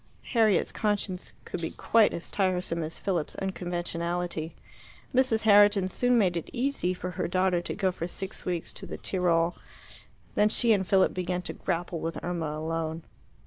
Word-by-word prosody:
Harriet's 220 -6 +3
conscience 205 -3 -2
could 170 - -5
be 165 - -2
quite 225 -2 +3
as 170 - -5
tiresome 180 -3 0
as 160 +1 -4
Philip's 175 -6 -2
unconventionality. 175 -3 -3 0.6
Mrs. 255 -4 +3
Herriton 205 -2 +6
soon 245 +5 +2
made 185 -6 +3
it 170 - -4
easy 255 -7 0
for 180 0 -4
her - - -2
daughter 185 0 +2
to - - -5
go 190 -2 +1
for 170 -1 -4
six 190 +2 -6
weeks 175 -2 -3
to - - -9
the - - -6
Tirol. 175 -2 +1 0.8
Then 210 +1 +4
she 235 +1 +2
and 190 -3 0
Philip 190 -1 +4
began 180 0 -2
to - - -5
grapple 175 -2 -2
with 165 +1 -3
Irma 165 -3 -2
alone. 160 0 -3
180 Hz, 165 wpm, -28 LUFS, 170-200 Hz, 0.8 s, Herriton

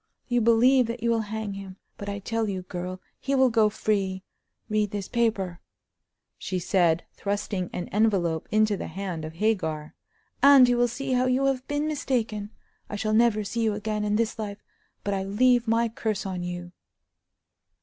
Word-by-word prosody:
You 245 -1 +2
believe 240 +3 +5
that 235 0 -5
you 235 - +2
will 230 - +2
hang 220 -2 -3
him; 195 -1 -8 0.2
but 200 - -6
I 200 - -3
tell 225 +2 -2
you, 190 -2 -3
girl, 180 0 -5 0.2
he 275 +1 -1
will 260 -2 +4
go 220 -2 +4
free. 195 -3 -1 0.4
Read 215 -1 +1
this 200 -1 -4
paper," 210 -7 0 0.8
she 185 - -3
said, 175 -2 +2
thrusting 200 -2 -2
an 175 - -4
envelope 190 -7 +1
into 215 -1 +3
the - - -5
hand 185 -4 -5
of 155 - -7
Hagar, 165 -6 -1 0.5
"and 275 -2 +8
you 245 - +3
will 245 0 +3
see 270 +3 -4
how 255 0 +2
you 255 +2 +2
have 265 -1 0
been 290 +1 -1
mistaken. 230 -8 -1 0.4
I - - -4
shall 215 +1 -1
never 220 -1 +3
see 230 +4 -3
you 220 -2 +1
again 210 0 -2
in 210 0 +1
this 225 0 0
life; 205 -1 -5 0.4
but 200 - -1
I 195 - -1
leave 240 +4 +3
my 230 +1 +3
curse 220 -3 -3
on 185 -2 -3
you!" 175 0 -5
215 Hz, 180 wpm, -26 LUFS, 190-235 Hz, 0.8 s, and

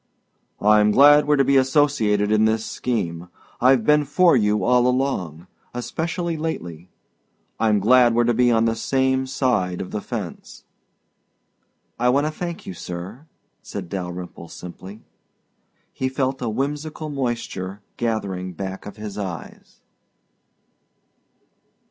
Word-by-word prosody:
"I'm 105 0 +5
glad 145 +5 +6
we're 150 - +4
to 140 - +3
be 140 +1 +4
associated 130 -7 +2
in 110 0 +4
this 110 0 +1
scheme 90 -8 -3 0.3
I've 125 -2 +4
been 150 0 +4
for 170 +3 +4
you 105 -3 +2
all 125 0 +3
along 110 - -1 0.3
especially 165 +7 -3
lately. 90 - -5 0.7
I'm 110 -2 +3
glad 120 +3 +5
we're 120 - +4
to 120 0 +2
be 125 +1 +3
on 115 -1 +3
the 115 - +2
same 130 +2 0
side 120 -10 0
of 90 - -6
the 105 - -3
fence." 105 -8 -7 1.4
"I 125 +1 +3
want 140 +4 +2
to 155 - -1
thank 170 +1 -6
you, - - -6
sir," 90 - -8 0.3
said - - -7
Dalyrimple 90 -2 -6
simply. 95 +4 -10 0.9
He 130 - -2
felt 130 0 -2
a 120 - -1
whimsical 150 +6 -3
moisture 115 -7 -4
gathering 100 -6 -2
back 95 +2 -6
of 105 - -10
his 105 -1 -7
eyes. 90 -4 -8
115 Hz, 130 wpm, -22 LUFS, 100-135 Hz, 1.4 s, glad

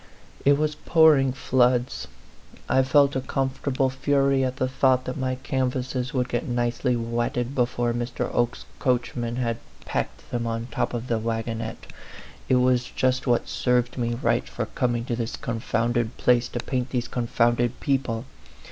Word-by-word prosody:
It 140 0 +6
was 155 0 0
pouring 155 -3 +4
floods. 125 -1 +1 0.6
I 130 - +4
felt 140 +1 +4
a 130 - 0
comfortable 135 0 -1
A - - +2
PHANTOM 135 +2 -4
LOVER. - - +5
11 140 0 +4
fury 135 -1 +3
at 130 -1 -1
the 130 - 0
thought 130 -1 +2
that 130 - -3
my 130 -2 -1
canvases 130 -1 -2
would 125 -2 0
get 120 -1 -2
nicely 120 0 0
wetted 120 +2 -1
before 120 -2 0
Mr. 120 +1 -2
Oke's 120 0 0
coachman 120 -2 0
had 115 -2 -1 0.3
packed - - -4
them 120 -1 -1
on 115 0 -2
the - - -13
top - - 0
of 120 0 -3
the 115 -3 0
wagonette. 115 0 -3 0.6
It 130 - +5
was 125 -1 +3
just 130 +1 0
what 120 -1 +2
served 125 -1 +1
me 120 -1 0
right 115 - 0
for - - -3
coming 120 -2 -1
to 120 - -1
this 115 -1 -3
confounded 115 +1 -1
place 125 0 +3
to - - -5
paint 130 0 -2
these 120 -1 -2
con 120 -1 -3
founded 120 +1 +1
people. 125 -4 -1
125 Hz, 175 wpm, -25 LUFS, 120-130 Hz, 0.6 s, It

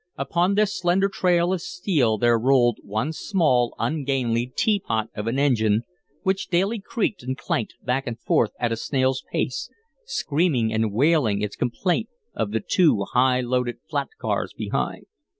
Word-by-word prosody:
Upon 170 +8 +1
this 210 -1 +1
slender 185 +2 +2
trail 180 -2 +2
of 185 - -2
steel 150 - 0
there 120 +1 +3
rolled 120 -2 +3
one 110 +10 -2
small, 150 - +1
ungainly 130 -6 0
teapot 150 - 0
of 105 +2 -4
an 120 +3 0
engine 115 -6 +2 0.4
which 190 -1 0
daily 195 +6 +1
creaked 210 0 -2
and 130 +2 -4
clanked 115 -4 -2
back 130 +2 -1
and 120 -1 -4
forth 115 - +2
at 120 -1 0
a 115 - -1
snail's 130 +1 0
pace, 135 +1 -2 0.3
screaming 145 - 0
and 110 -1 +1
wailing 120 -4 +2
its 105 - -3
complaint 180 - -1 0.2
of 110 -2 -2
the 110 0 -2
two 155 - +3
high 125 0 +3
loaded 125 0 -1
flat - - -1
cars - - -2
behind. - - -3
130 Hz, 155 wpm, -24 LUFS, 115-175 Hz, 0.4 s, there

